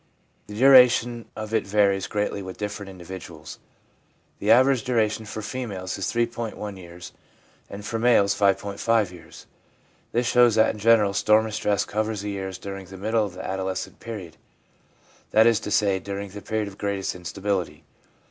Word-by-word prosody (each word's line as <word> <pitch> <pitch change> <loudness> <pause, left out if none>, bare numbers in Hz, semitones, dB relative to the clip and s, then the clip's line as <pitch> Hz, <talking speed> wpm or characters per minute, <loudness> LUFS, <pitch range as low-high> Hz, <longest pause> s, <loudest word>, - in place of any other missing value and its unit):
The 105 - -9
duration 120 -2 +5
of 110 0 -6
it 110 -3 +1
varies 100 -2 +2
greatly 105 -1 -2
with 95 -1 -8
different 105 -1 -5
individuals; 85 -4 -10 0.8
the 105 - -2
average 130 +1 +5
duration 110 -3 0
for 110 0 -6
females 100 -7 -5
is 95 - -3
3.1 115 -3 -3
years, 90 -1 -11 0.6
and 100 +1 -8
for 115 0 -3
males 110 -4 +4
5.5 100 +1 +1
years. 90 - -13 0.7
This 120 +1 0
shows 120 -2 +4
that 110 0 +4
in 105 - -10
general 105 -2 +4
storm 110 +2 +3
and 110 - -6
stress 105 -2 0
covers 110 -1 -2
the 105 0 -4
years 95 -1 -5
during 95 -1 -8
the 95 +1 -10
middle 110 +3 0
of 90 - -12
the - - -7
adolescent 95 -1 -4
period; 100 -8 -8 0.9
that 110 +1 +5
is 115 -2 +4
to - - -6
say, 100 -2 +2
during 100 +1 -6
the 105 +1 -9
period 110 -1 -2
of 100 -1 -11
greatest 100 -2 -2
instability. 90 -2 -3
105 Hz, 165 wpm, -24 LUFS, 95-110 Hz, 0.9 s, duration